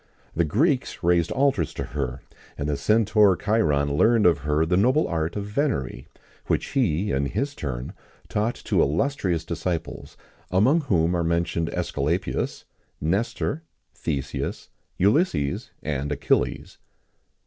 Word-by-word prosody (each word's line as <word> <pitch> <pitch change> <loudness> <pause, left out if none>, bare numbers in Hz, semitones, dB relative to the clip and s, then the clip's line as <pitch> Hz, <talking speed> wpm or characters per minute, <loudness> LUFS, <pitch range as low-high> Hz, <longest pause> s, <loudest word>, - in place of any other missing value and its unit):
[XIX - - -35
5] - - -17
The 85 - +3
Greeks 130 - 0
raised 85 -1 +3
altars 130 - +1
to - - -3
her, 65 -3 -4 0.4
and 70 - -2
the 75 - 0
centaur 105 +5 +4
Chiron 75 -10 +1
learned 115 +7 +4
of 85 -5 +5
her 75 +2 +1
the 90 +2 +1
noble 130 - +3
art 80 -1 -2
of 100 -1 -3
venery, 105 - -2 0.4
which - - 0
he, 100 - +1
in 70 +1 0
his 140 - -2
turn, 65 - -5 0.3
taught 110 +3 -1
to - - 0
illustrious 85 - 0
disciples, 85 0 -4 0.3
among 120 - +3
whom 85 - +1
are 85 -1 +1
mentioned 85 0 0
Æsculapius, 80 +7 -2 0.4
Nestor, 115 - -1 0.3
Theseus, 70 -2 -4 0.3
Ulysses, 100 - +1
and 75 -1 -2
Achilles. 75 - 0
85 Hz, 135 wpm, -24 LUFS, 75-110 Hz, 0.4 s, of